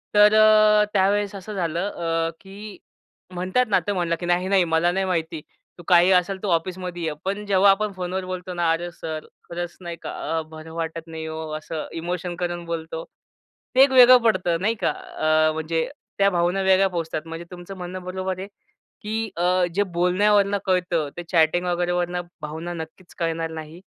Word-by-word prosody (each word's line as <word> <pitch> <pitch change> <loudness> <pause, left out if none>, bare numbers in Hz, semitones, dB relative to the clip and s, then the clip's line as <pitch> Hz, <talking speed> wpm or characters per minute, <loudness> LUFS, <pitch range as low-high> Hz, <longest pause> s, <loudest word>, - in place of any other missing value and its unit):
तर 210 0 +7
अ, 215 -1 +6
त्यावेळेस 200 +1 +2
असं 195 +2 -7
झालं, 175 0 -1
अ, 165 -2 -1
की 200 +1 -10 0.6
म्हणतात 185 +8 +1
ना 205 - +4
तर 205 - +1
म्हणला, 175 -3 0
की 175 - -6
"नाही-नाही, 180 +2 +2
मला 165 +1 +2
नाही 190 +1 0
माहिती 165 -3 -2 0.4
तू 175 - -12
काही 175 +2 +6
असेल 185 +1 +2
तर - - -1
ऑफिसमध्ये 180 0 -2
ये." 160 -2 -1
पण 200 +2 -2
जेव्हा 200 0 +5
आपण 210 +2 0
फोनवर 185 0 -4
बोलतो 185 0 -5
ना, 175 -1 0
"अरे! 175 +2 -2
सर 160 -2 -6 0.2
खरंच 175 0 -5
नाही 170 -1 -6
का - - -6 0.3
अ, - - -2
बरं 160 0 -10
वाटत 165 0 -4
नाही 160 -1 -6
ओ," 160 0 -5
असं 155 0 -6
इमोशन 175 +1 -4
करून 175 -1 -3
बोलतो. 160 -1 -5 0.7
ते 260 - +7
एक 275 - +4
वेगळं 255 -1 +9
पडतं 180 -7 +1
नाही 220 +4 +1
का. - - +3
अ, 155 0 +1
म्हणजे 160 +1 -1 0.3
त्या 200 0 +4
भावना 175 +2 +1
वेगळ्या 190 0 +4
पोहोचतात 165 -3 -3
म्हणजे 165 +1 -7
तुमचं 180 +2 -9
म्हणणं 180 +1 -6
बरोबर 185 0 -4
आहे, 190 - -5 0.5
की 220 +1 -3
अ, 180 +1 +2
जे 205 - +3
बोलण्यावरून 200 +3 +2
कळतं 180 -5 0
ते 175 - -5
चॅटिंग 170 +1 +3
वगैरे 175 0 0
वरनं 175 0 -1 0.2
भावना 160 +3 -5
नक्कीच 170 +2 -9
कळणार 165 -1 -1
नाही. 160 +2 -8
175 Hz, 180 wpm, -23 LUFS, 165-195 Hz, 0.7 s, वेगळं